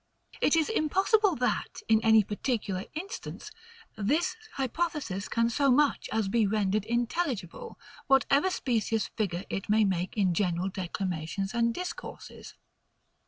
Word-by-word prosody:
It -, -, +4 dB
is 320 Hz, -2 st, +2 dB
impossible 390 Hz, +1 st, +2 dB
that, 250 Hz, +1 st, -2 dB
in 220 Hz, -1 st, +4 dB
any 220 Hz, -1 st, +6 dB
particular 205 Hz, -2 st, -2 dB
instance, 380 Hz, +8 st, -6 dB, 0.4 s
this 255 Hz, +11 st, 0 dB, 0.2 s
hypothesis 270 Hz, -, -2 dB
can 230 Hz, 0 st, +2 dB
so 280 Hz, +3 st, +2 dB
much 285 Hz, +3 st, +2 dB
as 220 Hz, -2 st, 0 dB
be 215 Hz, +1 st, +2 dB
rendered 205 Hz, 0 st, 0 dB
intelligible, 240 Hz, -, -2 dB, 0.3 s
whatever 275 Hz, +5 st, +4 dB
specious 225 Hz, -, -1 dB
figure 190 Hz, -4 st, -3 dB
it 195 Hz, -, -4 dB
may 215 Hz, 0 st, +4 dB
make 185 Hz, +1 st, -2 dB
in 190 Hz, -4 st, +3 dB
general 180 Hz, 0 st, 0 dB
declamations 185 Hz, +1 st, -3 dB
and 235 Hz, 0 st, +2 dB
discourses. 360 Hz, +9 st, -7 dB
225 Hz, 125 wpm, -29 LUFS, 195-285 Hz, 0.4 s, any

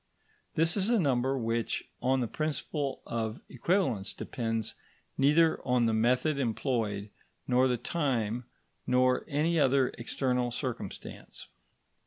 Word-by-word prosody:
This 165 Hz, +1 st, +3 dB
is 200 Hz, +1 st, +2 dB
a 240 Hz, -, +4 dB
number 135 Hz, -4 st, +1 dB
which, 115 Hz, -1 st, -1 dB
on 130 Hz, +1 st, +2 dB
the 120 Hz, -, 0 dB
principle 150 Hz, +1 st, -3 dB
of 115 Hz, 0 st, -3 dB
equivalence, 130 Hz, -, 0 dB
depends 115 Hz, -2 st, -3 dB, 0.4 s
neither 160 Hz, +4 st, +4 dB
on 125 Hz, -2 st, +2 dB
the 115 Hz, -, +2 dB
method 125 Hz, +6 st, +2 dB
employed, 110 Hz, -5 st, -1 dB, 0.4 s
nor 125 Hz, +1 st, +4 dB
the 125 Hz, -1 st, +1 dB
time, 125 Hz, -4 st, -1 dB, 0.4 s
nor 125 Hz, 0 st, +3 dB
any 160 Hz, +3 st, +1 dB
other 135 Hz, -2 st, +4 dB
external 125 Hz, 0 st, 0 dB
circumstance. 125 Hz, 0 st, -6 dB
125 Hz, 120 wpm, -30 LUFS, 115-145 Hz, 0.4 s, a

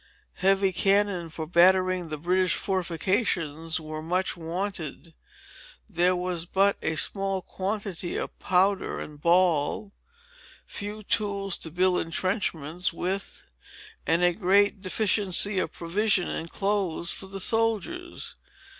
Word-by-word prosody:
Heavy 195 Hz, 0 st, +3 dB
cannon, 195 Hz, -3 st, +2 dB
for 160 Hz, 0 st, -5 dB
battering 185 Hz, +1 st, +4 dB
the 155 Hz, -, -3 dB
British 180 Hz, +3 st, +2 dB
fortifications, 170 Hz, -4 st, -1 dB
were 155 Hz, 0 st, -6 dB
much 180 Hz, +4 st, 0 dB
wanted. 170 Hz, -2 st, -5 dB, 0.7 s
There 180 Hz, -2 st, +2 dB
was 180 Hz, -1 st, -3 dB
but 195 Hz, +2 st, +3 dB
a 160 Hz, -, 0 dB
small 195 Hz, +2 st, 0 dB
quantity 195 Hz, -2 st, -3 dB
of -, -, -5 dB
powder 190 Hz, +1 st, +1 dB
and 150 Hz, -1 st, -9 dB
ball, 175 Hz, +3 st, +2 dB, 0.7 s
few 210 Hz, +1 st, -6 dB
tools 200 Hz, -2 st, -1 dB
to 160 Hz, -, -6 dB
build 180 Hz, +2 st, +2 dB
entrenchments 175 Hz, -1 st, -2 dB
with, 190 Hz, +4 st, -4 dB, 0.6 s
and 170 Hz, +2 st, +3 dB
a 175 Hz, 0 st, +4 dB
great 200 Hz, +1 st, +3 dB
deficiency 200 Hz, 0 st, +1 dB
of -, -, -1 dB
provisions 185 Hz, +2 st, +1 dB
and 165 Hz, -, -4 dB
clothes 195 Hz, -4 st, 0 dB
for 190 Hz, -, -3 dB
the 195 Hz, 0 st, -6 dB
soldiers. 225 Hz, -, -1 dB
185 Hz, 120 wpm, -27 LUFS, 170-200 Hz, 0.7 s, battering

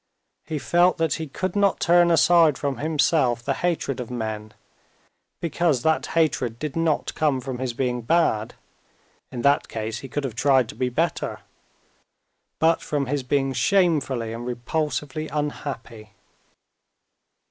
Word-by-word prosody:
He 155 Hz, -, -3 dB
felt 175 Hz, +5 st, +3 dB
that 165 Hz, -4 st, +1 dB
he 160 Hz, -, -4 dB
could 185 Hz, +6 st, -4 dB
not 200 Hz, -1 st, +2 dB
turn 175 Hz, 0 st, +4 dB
aside 165 Hz, -3 st, +5 dB
from 140 Hz, -2 st, -2 dB
himself 145 Hz, -5 st, +1 dB
the 135 Hz, -, 0 dB
hatred 165 Hz, -5 st, -2 dB
of 125 Hz, -, -5 dB
men, 110 Hz, -3 st, -4 dB, 0.9 s
because 165 Hz, -6 st, 0 dB
that 160 Hz, 0 st, +1 dB
hatred 130 Hz, -8 st, +1 dB
did 150 Hz, +1 st, -5 dB
not 165 Hz, -2 st, 0 dB
come 150 Hz, -4 st, +1 dB
from 130 Hz, -1 st, -5 dB
his 130 Hz, -2 st, -2 dB
being 125 Hz, 0 st, -1 dB
bad 115 Hz, -5 st, +1 dB, 0.8 s
(in 120 Hz, -2 st, -5 dB
that 140 Hz, +1 st, +3 dB
case 110 Hz, 0 st, -4 dB
he 135 Hz, -, -8 dB
could 145 Hz, +4 st, -3 dB
have 130 Hz, -4 st, -3 dB
tried 130 Hz, 0 st, +3 dB
to -, -, -8 dB
be 125 Hz, +2 st, -1 dB
better), 160 Hz, +7 st, -2 dB, 1.2 s
but 165 Hz, +1 st, +3 dB
from 145 Hz, -2 st, -2 dB
his 145 Hz, +2 st, -1 dB
being 135 Hz, +1 st, 0 dB
shamefully 140 Hz, -, +1 dB
and 120 Hz, +1 st, -6 dB
repulsively 150 Hz, +4 st, -3 dB
unhappy. 130 Hz, -8 st, -5 dB
140 Hz, 145 wpm, -24 LUFS, 125-160 Hz, 1.2 s, aside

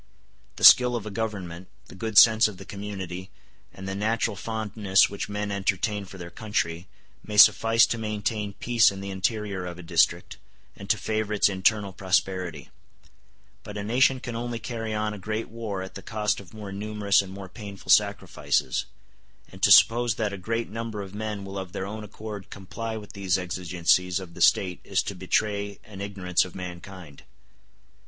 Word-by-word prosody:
The -, -, -9 dB
skill 125 Hz, -1 st, +8 dB
of 115 Hz, -3 st, -4 dB
a 105 Hz, -, -6 dB
government, 95 Hz, -5 st, -5 dB, 0.2 s
the -, -, -14 dB
good 110 Hz, +2 st, -4 dB
sense 110 Hz, -1 st, +8 dB
of 105 Hz, -3 st, -8 dB
the 95 Hz, -, -11 dB
community, 95 Hz, -3 st, -6 dB, 0.4 s
and 95 Hz, 0 st, -9 dB
the 95 Hz, -, -3 dB
natural 110 Hz, +2 st, 0 dB
fondness 105 Hz, -3 st, +1 dB
which 100 Hz, 0 st, -5 dB
men 105 Hz, 0 st, -3 dB
entertain 100 Hz, +1 st, -1 dB
for 95 Hz, -, -12 dB
their 85 Hz, -1 st, -9 dB
country, 90 Hz, -6 st, -3 dB, 0.4 s
may 105 Hz, -1 st, -6 dB
suffice 115 Hz, +2 st, +7 dB
to 115 Hz, -, -3 dB
maintain 105 Hz, -1 st, -2 dB
peace 115 Hz, +1 st, +3 dB
in 95 Hz, -, -7 dB
the 100 Hz, 0 st, -6 dB
interior 100 Hz, 0 st, -2 dB
of 90 Hz, -1 st, -6 dB
a 90 Hz, -, -10 dB
district, 80 Hz, -, +1 dB, 0.4 s
and 100 Hz, -, -11 dB
to 110 Hz, -, +3 dB
favor 110 Hz, +1 st, -2 dB
its 100 Hz, -, +4 dB
internal 100 Hz, +1 st, +1 dB
prosperity; 90 Hz, -5 st, -1 dB, 0.9 s
but 105 Hz, 0 st, -8 dB
a 100 Hz, -, -4 dB
nation 130 Hz, +4 st, +3 dB
can 120 Hz, -2 st, -6 dB
only 120 Hz, 0 st, -3 dB
carry 115 Hz, -1 st, -5 dB
on 105 Hz, 0 st, -1 dB
a 105 Hz, -, -8 dB
great 110 Hz, +3 st, -4 dB
war 110 Hz, -4 st, -5 dB
at 95 Hz, -, -9 dB
the 95 Hz, -, -8 dB
cost 105 Hz, 0 st, -1 dB
of 100 Hz, -, -13 dB
more 105 Hz, -3 st, -8 dB
numerous 105 Hz, 0 st, +1 dB
and 95 Hz, -1 st, -9 dB
more 95 Hz, 0 st, -8 dB
painful 100 Hz, 0 st, -6 dB
sacrifices; 75 Hz, -2 st, +1 dB, 0.7 s
and 95 Hz, -, -13 dB
to 100 Hz, -, +4 dB
suppose 115 Hz, +4 st, +6 dB
that 105 Hz, -3 st, -2 dB
a -, -, -5 dB
great 115 Hz, +4 st, -2 dB
number 110 Hz, -2 st, -5 dB
of 95 Hz, 0 st, -11 dB
men 105 Hz, -1 st, -4 dB
will 100 Hz, 0 st, -6 dB
of 95 Hz, -1 st, -8 dB
their 95 Hz, -, -3 dB
own 105 Hz, +2 st, -6 dB
accord 105 Hz, -1 st, -8 dB
comply 110 Hz, +3 st, -6 dB
with 105 Hz, -2 st, -10 dB
these 100 Hz, -2 st, 0 dB
exigencies 90 Hz, 0 st, 0 dB
of 90 Hz, -3 st, -10 dB
the -, -, -10 dB
State 90 Hz, -2 st, +3 dB
is 100 Hz, -1 st, 0 dB
to -, -, -4 dB
betray 100 Hz, +2 st, -1 dB
an 100 Hz, -2 st, -11 dB
ignorance 95 Hz, -3 st, 0 dB
of 95 Hz, -, -10 dB
mankind. 90 Hz, -4 st, -9 dB
100 Hz, 185 wpm, -26 LUFS, 95-110 Hz, 0.9 s, skill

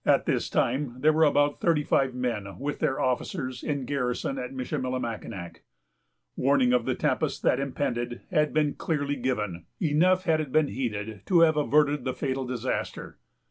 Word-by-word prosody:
At -, -, +3 dB
this -, -, 0 dB
time 130 Hz, 0 st, 0 dB
there 155 Hz, +2 st, +5 dB
were 160 Hz, +1 st, +4 dB
about 145 Hz, 0 st, +2 dB
thirty 165 Hz, -4 st, +2 dB
five 135 Hz, -3 st, +1 dB
men, 115 Hz, -6 st, -3 dB
with 145 Hz, +2 st, -4 dB
their 135 Hz, -, 0 dB
officers, 130 Hz, 0 st, -2 dB
in 140 Hz, -4 st, -2 dB
garrison 140 Hz, -, -2 dB
at 255 Hz, -, -5 dB
Michillimackinac. 130 Hz, -, -4 dB, 0.7 s
Warning 130 Hz, -2 st, +3 dB
of 125 Hz, -2 st, +2 dB
the -, -, 0 dB
tempest -, -, -1 dB
that -, -, +3 dB
impended 125 Hz, -3 st, -2 dB
had 150 Hz, 0 st, +2 dB
been 150 Hz, -2 st, +1 dB
clearly 145 Hz, -3 st, -1 dB
given; 105 Hz, -10 st, -2 dB
enough, 180 Hz, +4 st, +3 dB
had 160 Hz, -3 st, +2 dB
it 145 Hz, -4 st, -6 dB
been 155 Hz, 0 st, +3 dB
heeded, 110 Hz, -5 st, -4 dB
to 175 Hz, -3 st, +5 dB
have 160 Hz, -2 st, +5 dB
averted 150 Hz, -1 st, +2 dB
the 130 Hz, -1 st, -2 dB
fatal 135 Hz, -2 st, -2 dB
disaster. 125 Hz, 0 st, -4 dB
135 Hz, 165 wpm, -27 LUFS, 125-150 Hz, 0.7 s, there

